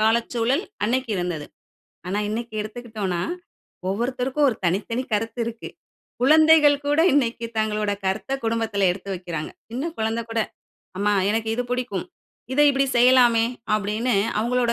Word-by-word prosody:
காலச்சூழல் 235 - +1 0.2
அன்னைக்கு 250 +1 0
இருந்தது. 175 -4 -3 0.6
ஆனா 200 +3 -1
இன்னைக்கு 230 +1 -4
எடுத்துக்கிட்டோம்னா, 215 -5 -4 0.7
ஒவ்வொருத்தருக்கும் 250 +6 0
ஒரு 220 - -3
தனித்தனி 210 +8 0
கருத்து 225 +3 -1
இருக்கு. 230 -1 -6 0.5
குழந்தைகள் 310 0 +6
கூட 290 +2 +2
இன்னைக்கு 235 -4 +1
தங்களோட 215 -1 0
கருத்த 195 +8 -2
குடும்பத்துல 225 -4 +1
எடுத்து 195 +2 -8
வைக்கிறாங்க. 170 -4 -5 0.2
சின்ன 275 +8 -3
குழந்தை 225 +1 -1
கூட, 225 0 -1 0.6
"அம்மா, 205 +1 +2 0.2
எனக்கு 220 0 -1
இது 245 - -1
பிடிக்கும். 250 - -2 0.5
இத 280 - -3
இப்படி 275 0 +1
செய்யலாமே." 240 -2 +5 0.3
அப்டீன்னு 215 +2 0 0.2
அவங்களோட 240 +1 +1
230 Hz, 125 wpm, -23 LUFS, 210-250 Hz, 0.7 s, குழந்தைகள்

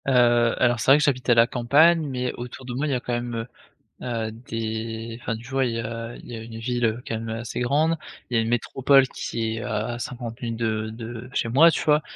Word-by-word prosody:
Heu, - - +3 0.5
alors 120 -1 +2
c'est - - 0
vrai 140 - +9
que 150 - +1
j'habite 130 -3 0
à 120 - +6
la 115 0 +7
campagne, 150 +7 +4
mais 125 -2 -2
autour 125 +2 -8
de 125 - -5
moi 140 +5 -1
il - - -1
y - - +1
a - - 0
quand 120 - -4
même, 120 0 -2
heu 115 0 -3 0.6
heu, 115 -3 -2
des 115 0 -5
enfin 115 - -2
tu 115 +2 -10
vois, 135 -1 +1
il 120 - -1
y - - -2
a 115 +1 -5
il - - -13
y 120 - -6
a 110 - -7
une 115 0 -8
ville, 120 +1 -1
heu, 115 +2 0
quand 115 - -2
même, 115 0 -6
heu, 110 0 -3
assez 115 +1 -4
grande, 155 +6 +2 0.3
il 120 - -2
y - - +5
a - - +4
une - - -3
métropole 130 +3 +3
qui 115 -2 -3
est - - -4
à 110 +3 -2
50 120 -1 -6
minutes 115 -2 -4
de 110 -1 -1
de 115 +1 -7
de 125 - -11
chez 115 - 0
moi, 155 +8 +7
tu - - -1
vois? 150 0 +4
120 Hz, 270 wpm, -24 LUFS, 115-130 Hz, 0.6 s, vrai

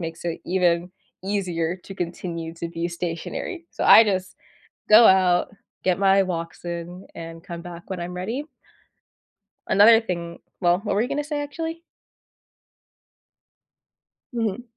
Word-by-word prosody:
makes 165 0 -6
it 170 -1 -3
even 175 -1 +1 0.3
easier 180 -4 -1
to 190 +1 -11
continue 170 -2 -5
to 170 0 -5
be 170 +1 -3
stationary, 175 - -5
so - - -4
I 225 - +9
just 190 -2 -2 0.5
go 220 +2 +9
out, 185 -2 +4 0.3
get 185 0 +2
my 195 0 +4
walks 170 -2 -5
in, 175 +2 -6
and 165 0 -8
come 170 -1 -7
back 175 +1 -10
when 185 - -3
I'm 175 +1 -5
ready. 225 +11 -4 1.2
Another 225 +3 +7
thing 170 -6 -5 0.2
well, 175 0 +3
what 205 0 -2
were 210 - +2
you 250 - -2
gonna 295 +1 -2
say, 295 -1 -3
actually? 325 +3 -5 2.5
Mhm. 225 -1 -2
180 Hz, 140 wpm, -24 LUFS, 170-210 Hz, 2.5 s, I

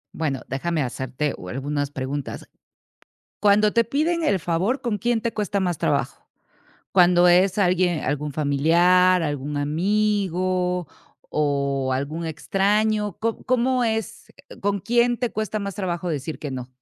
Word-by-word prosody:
Bueno, 140 -5 -2
déjame 155 +4 -1
hacerte, 130 +3 -3
uh, 90 - -9
algunas 145 +3 -2
preguntas. 135 0 -5 0.9
Cuando 210 +1 +4
te 230 -1 +2
piden 320 +7 0
el 200 -10 +2
favor, 185 +12 -1
¿con 235 -5 -1
quién 235 +1 0
te 235 - -2
cuesta 205 -2 -1
más 175 -3 -1
trabajo? - - -1 0.7
¿Cuándo 180 -1 +5
es 185 +3 +4
alguien- 180 -3 +2
algún 145 +2 -2
familiar, 170 +6 +3
algún 145 -1 -3
amigo 185 +2 0 0.4
o 140 -3 0
algún 145 +5 -3
extraño? 205 +5 0
¿Co 225 0 -2
cómo 255 0 +1
es? 225 -2 -2 0.3
¿Con 200 0 0
quién 240 +4 +2
te 245 -2 -2
cuesta 215 0 -2
más 200 -2 -4
trabajo 180 -2 -3
decir 155 0 -4
que 145 -3 -5
no? 125 -1 -6
180 Hz, 140 wpm, -23 LUFS, 145-210 Hz, 0.9 s, Cuándo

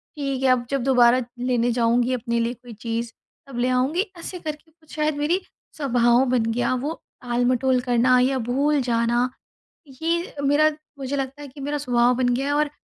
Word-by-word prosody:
ठीक 275 -3 -3
है, 265 - +4
अब 250 -1 +2
जब 275 -3 -1
दोबारा 250 -1 +5 0.2
लेने 245 -1 +1
जाऊँगी 240 +1 +2
अपने 235 -1 -1
लिए 230 +1 0
कोई 245 -1 -13
चीज़, 230 +2 -4 0.4
तब 270 -3 -8
ले 250 +1 +1
आऊँगी"। 260 +8 +1 0.2
ऐसे 360 +2 -6
करके 310 0 -7
कुछ 315 -1 -16
शायद 305 -1 0
मेरी 320 +6 +1 0.4
स्वभाव 245 -3 +3
बन 245 -3 +2
गया, 245 +2 0
वो 290 +6 -4 0.2
टाल-मटोल 250 +1 +1
करना 250 0 +3
या 260 +2 +2
भूल 285 +3 +2
जाना। 240 0 +1 0.7
ये 340 +2 -1
मेरा 290 +2 +4 0.3
मुझे 275 +1 -3
लगता 270 +1 -4
है 290 - -8
कि 275 +2 -13
मेरा 290 +2 -2
स्वभाव 245 -3 +2
बन 255 -1 +1
गया 270 +3 -1
है, 285 - 0
और 295 0 +1
255 Hz, 185 wpm, -23 LUFS, 240-290 Hz, 0.7 s, दोबारा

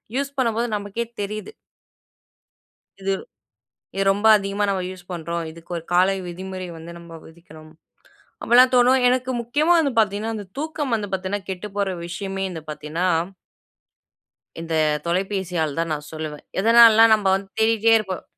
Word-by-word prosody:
Use 280 0 -1
பண்ணும்போது 235 -2 0
நமக்கே 205 +3 -4 0.2
தெரியுது. 210 - -5 1.5
இது. 195 0 -1 0.8
இது 195 - +1
ரொம்ப 205 +2 -1
அதிகமா 200 0 -2
நம்ம 190 -2 -1
யூஸ் 185 -1 -11
பண்றோம். 170 0 -4
இதுக்கு 165 +2 -15
ஒரு 165 - -6
காலை 185 +2 +4
விதிமுறை 185 +1 -7
வந்து 165 +1 -10
நம்ம 170 -1 -11
விதிக்கணும். 160 -1 -15 0.7
அப்டிலாம் 250 +2 +6
தோணும். 250 +2 +5
எனக்கு 255 0 0
முக்கியமா 295 +8 +2
வந்து 280 -5 0
பார்த்தீங்கன்னா, 215 +2 0
அந்த 205 -2 -6
தூக்கம் 295 -4 -3
வந்து 210 -2 -3
பார்த்தீங்கன்னா 190 +1 -3
கெட்டு 190 +2 -5
போற 200 -1 0 0.2
விஷயமே 195 +2 -5
வந்து 165 -3 -7
பார்த்தீங்கன்னா 155 +4 -3 1.5
இந்த 165 -1 -4 0.3
தொலைபேசியால 180 -4 -1
தான் 165 -1 -1
நான் 150 0 -8
சொல்லுவேன். 155 -1 -6 0.2
எதனாலனா, 225 +1 +7
நம்ம 210 -2 -2
வந்து 195 0 -7
தேடிட்டே 225 0 +3
இருப்போம். 190 -4 -5
195 Hz, 140 wpm, -22 LUFS, 170-225 Hz, 1.5 s, எதனாலனா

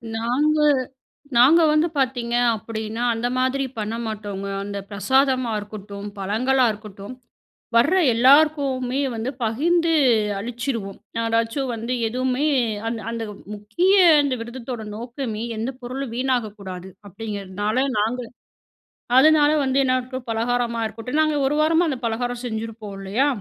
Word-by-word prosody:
நாங்க 265 +7 +1 0.8
நாங்க 300 +8 +7
வந்து 305 +2 +3
பார்த்தீங்க 245 -3 -1 0.2
அப்பிடீன்னா, 220 +1 -5
அந்த 230 +2 -1
மாதிரி 260 +2 +1
பண்ண 215 +1 -3
மாட்டோங்க. 205 -2 -5 0.2
அந்த 200 0 -5
பிரசாதமா 255 +4 +2
இருக்கட்டும், 205 -1 -8
பழங்களா 250 +7 +1
இருக்கட்டும், 205 +1 -10 0.6
வர்ற 285 +10 +4 0.2
எல்லாருக்குமே 270 0 +3 0.2
வந்து 225 +3 -3
பகிர்ந்து 330 +9 +1 0.5
அளிச்சிருவோம். 230 -2 -4 0.2
யாராச்சும் 230 +4 0
வந்து 230 +2 -3
எதுவுமே 255 +5 0 0.4
அந்த 230 0 -2
அந்த 230 -1 -4 0.3
முக்கிய 215 - +1 0.3
இந்த 270 -3 0
விரதத்தோட 235 -1 -6
நோக்கமே, 235 -1 -5
எந்த 230 +5 -2
பொருளும் 250 0 -5
வீணாகக்கூடாது 210 -8 -3 0.2
அப்பிடீங்கிறதுனால, 205 +1 -4 0.2
நாங்க 235 +4 0 1.0
அதனால 300 +1 +6
வந்து 265 0 +1
என்ன 255 - +2
இருக்கும்? 255 0 -7
பலகாரமா 235 +1 0
இருக்கட்டும், 225 +6 -4
நாங்க 310 -1 +1
ஒரு 280 - +1
வாரமா, 325 +2 +3
அந்த 265 - -3
பலகாரம் 245 +2 -2
செஞ்சிருப்போம் 220 -2 -5
இல்லையா? 200 +8 0
235 Hz, 120 wpm, -22 LUFS, 220-265 Hz, 1.0 s, நாங்க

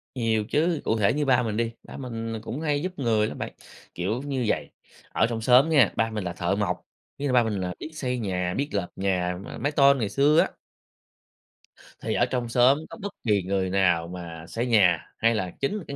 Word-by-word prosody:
Nhiều 110 -3 0
chứ, 160 +1 +1
cụ 110 - +1
thể 100 -2 +3
như 150 +1 0
ba 125 -2 +3
mình 110 -2 -2
đi, 115 0 0
ba - - -10
mình 115 -3 -5
là 110 - -4
cũng 130 +6 -5
hay 145 -2 0
giúp 185 +3 -2
người 110 -4 +2
lắm - - -7
bạn, - - -5 0.4
kiểu 100 +8 -2
như 135 -3 -2
vầy, 75 -8 -1 0.4
ở - - +2
trong 115 -1 -3
xóm 125 +6 +5
nha, 140 -9 +5
ba 115 - +1
mình 110 -2 -4
là 85 -1 -3
thợ 85 +2 -1
mộc, 90 -3 -1 0.4
ý 145 - -2
là 130 - 0
ba 125 -1 +5
mình 110 -1 -2
là 90 -1 -3
biết 160 - -7
xây 125 -4 -2
nhà, 90 -4 -1
biết 140 +2 -1
lợp 100 -3 -1
nhà 90 -2 0
mà - - -8
mái 145 +5 -1
tôn 140 -1 +5
ngày 110 -5 -1
xưa 145 +6 +4
á. - - +3 1.5
Thì - - -2
ở - - +3
trong 125 -2 -2
xóm 125 +4 +5
có - - -9
bất 200 0 -5
kỳ 105 -5 +2
người 95 0 -1
nào 90 -3 +2
mà 85 -2 -8
xây 115 +6 -2
nhà, 95 -9 +4 0.2
hay 115 0 +3
là 95 -4 -2
chính 135 +9 0
là 205 - -6
cái 140 - -5
115 Hz, 235 wpm, -26 LUFS, 95-135 Hz, 1.5 s, xóm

